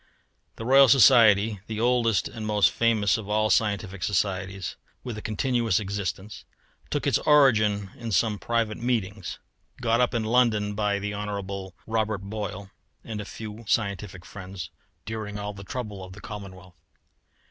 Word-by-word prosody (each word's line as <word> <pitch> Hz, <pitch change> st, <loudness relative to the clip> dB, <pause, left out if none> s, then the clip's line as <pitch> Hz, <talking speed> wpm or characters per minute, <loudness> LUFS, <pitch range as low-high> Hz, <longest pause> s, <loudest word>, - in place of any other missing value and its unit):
The 115 Hz, -, -7 dB
Royal 135 Hz, +2 st, +7 dB
Society, 110 Hz, -5 st, +6 dB
the 110 Hz, -1 st, -4 dB
oldest 120 Hz, -2 st, +2 dB
and 110 Hz, -, -8 dB
most 105 Hz, -1 st, +4 dB
famous 110 Hz, -3 st, +2 dB
of 105 Hz, -2 st, -8 dB
all 110 Hz, 0 st, +2 dB
scientific 100 Hz, -3 st, 0 dB
societies 95 Hz, -1 st, -1 dB, 0.3 s
with 120 Hz, -3 st, -5 dB
a 110 Hz, -, -6 dB
continuous 115 Hz, -2 st, 0 dB
existence, 100 Hz, 0 st, -4 dB, 0.5 s
took -, -, -2 dB
its -, -, +3 dB
origin 110 Hz, -9 st, +4 dB
in 115 Hz, -2 st, -6 dB
some 105 Hz, +2 st, +1 dB
private 115 Hz, -2 st, -1 dB
meetings, 105 Hz, -, -2 dB, 0.4 s
got 115 Hz, 0 st, +2 dB
up 125 Hz, -, +1 dB
in 115 Hz, -, 0 dB
London 110 Hz, -3 st, +2 dB
by 105 Hz, -1 st, 0 dB
the 105 Hz, +1 st, -4 dB
Hon. 100 Hz, -2 st, -5 dB
Robert 110 Hz, -3 st, -1 dB
Boyle 100 Hz, -1 st, -6 dB, 0.3 s
and 110 Hz, -2 st, -5 dB
a -, -, -7 dB
few 110 Hz, +2 st, -8 dB
scientific 100 Hz, -4 st, -1 dB
friends, 95 Hz, -3 st, -8 dB, 0.3 s
during 110 Hz, -2 st, -5 dB
all 105 Hz, 0 st, -4 dB
the 100 Hz, 0 st, -10 dB
trouble 105 Hz, -2 st, -6 dB
of 95 Hz, 0 st, -10 dB
the 100 Hz, -, -12 dB
Commonwealth. 95 Hz, -3 st, -9 dB
105 Hz, 150 wpm, -26 LUFS, 100-115 Hz, 0.5 s, Royal